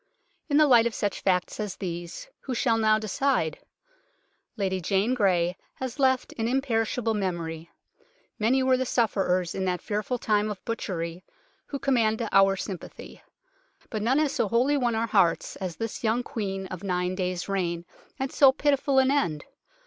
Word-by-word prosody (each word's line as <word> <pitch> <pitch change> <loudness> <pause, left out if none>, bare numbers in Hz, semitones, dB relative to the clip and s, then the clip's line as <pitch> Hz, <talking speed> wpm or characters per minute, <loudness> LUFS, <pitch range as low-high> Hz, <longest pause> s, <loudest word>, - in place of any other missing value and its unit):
In 285 - +3
the 305 - +7
light 240 -4 +6
of 235 - -5
such 205 - -2
facts 180 +1 0
as 210 -3 -3
these, 175 - -6
who 260 - -5
shall 230 -1 +2
now 215 -1 +4
decide? 215 - 0 1.0
Lady 190 -2 -1
Jane 200 +7 +1
Grey 180 -6 +2 0.2
has 260 +1 -6
left 260 -1 +2
an 225 - 0
im 260 +3 +2
perishable 225 -2 0
memory. 170 -4 -3 0.7
Many 250 +5 +2
were 260 0 +3
the 260 - 0
sufferers 190 -7 +1
in 190 - -2
that 180 -1 0
fearful 215 +4 -2
time 210 -2 +1
of 205 -3 -7
butchery 180 -6 -4 0.4
who 280 - -4
command 235 -5 +1
our 195 0 +5
sympathy, 190 -2 -8 0.7
but 215 - -2
none 245 +6 +2
has 300 -2 +2
so - - 0
wholly 245 +7 +2
won 245 -4 +1
our 225 +1 +1
hearts 195 -7 +2
as 185 -4 -4
this 225 +1 -5
young 230 +2 +1
Queen 195 -7 -4
of 185 -2 -6
a 200 - -6
nine 180 0 0
days' 185 -1 -2
reign, 175 -3 -2 0.3
and 265 0 -3
so 275 -2 +6
pitiful 280 0 +1
an 265 0 +5
end. 170 - 0
215 Hz, 170 wpm, -26 LUFS, 185-250 Hz, 1.0 s, the